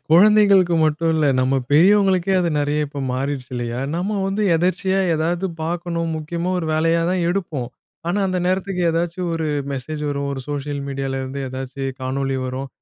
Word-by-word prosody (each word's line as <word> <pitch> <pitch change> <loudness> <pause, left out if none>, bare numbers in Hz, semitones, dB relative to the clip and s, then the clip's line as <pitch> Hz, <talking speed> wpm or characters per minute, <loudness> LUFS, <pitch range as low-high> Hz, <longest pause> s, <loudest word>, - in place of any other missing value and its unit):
குழந்தைங்களுக்கு 195 -1 +6
மட்டும் 155 +1 +1
இல்ல. 155 -2 +2
நம்ம 130 +1 +2 0.2
பெரியவங்களுக்கே 190 +3 +4
அது 170 - +1
நெறைய 150 +1 0
இப்ப 145 0 -7
மாறிருச்சு 135 0 -3
இல்லையா? 120 0 -3 0.2
நம்ம 185 +5 -1
வந்து 200 +2 -1
எதர்ச்சியா 185 +2 +1 0.2
ஏதாவது 170 +4 0 0.2
பார்க்கணும், 170 0 -2
முக்கியமா 170 +3 -3
ஒரு 165 - -3
வேலையா 165 +2 +2
தான் 185 -1 0
எடுப்போம். 165 -9 -2 0.4
ஆனா 195 - 0
அந்த 185 -1 -1
நேரத்துக்கு 185 0 -1
ஏதாச்சும் 170 +1 -1
ஒரு 160 -1 -2 0.3
மெசேஜ் 150 +3 -5
வரும். 140 0 -2
ஒரு 135 - -4
சோஷியல் 145 0 -3
மீடியாலேருந்து 135 0 -3
ஏதாச்சும் 135 +1 -4
காணொளி 135 +1 -1
வரும். 130 +2 -4
160 Hz, 155 wpm, -21 LUFS, 140-180 Hz, 0.4 s, குழந்தைங்களுக்கு